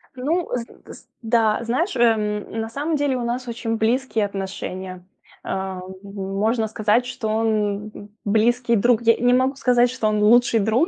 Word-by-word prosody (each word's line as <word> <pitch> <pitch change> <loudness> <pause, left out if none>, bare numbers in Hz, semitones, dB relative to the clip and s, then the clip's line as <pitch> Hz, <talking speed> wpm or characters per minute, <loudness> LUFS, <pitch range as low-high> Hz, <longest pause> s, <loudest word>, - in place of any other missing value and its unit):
Ну, 320 +7 -1
з 235 -1 -8
с - - -14
да, 225 -2 +2
знаешь, 260 - -1
эм, 215 -3 +1
на 225 - -3
самом 295 +6 -2
деле 285 -2 0
у 245 - -2
нас 245 +1 -3
очень 230 -1 -3
близкие 225 -1 +1
отношения. 190 -2 -6 0.4
Ам, 190 -1 -4 0.2
можно 200 +3 -1
сказать, 215 +2 +1
что 250 -2 -5
он 210 -1 -1 0.2
близкий 235 +3 +2
друг. 240 +2 +3
Я 230 0 +5
не 245 +1 +3
могу 260 +2 +2
сказать, 245 -2 +3
что 225 -4 -1
он 210 -1 +1
лучший 235 +1 +5
друг, 225 - +2
225 Hz, 160 wpm, -22 LUFS, 210-245 Hz, 0.4 s, Я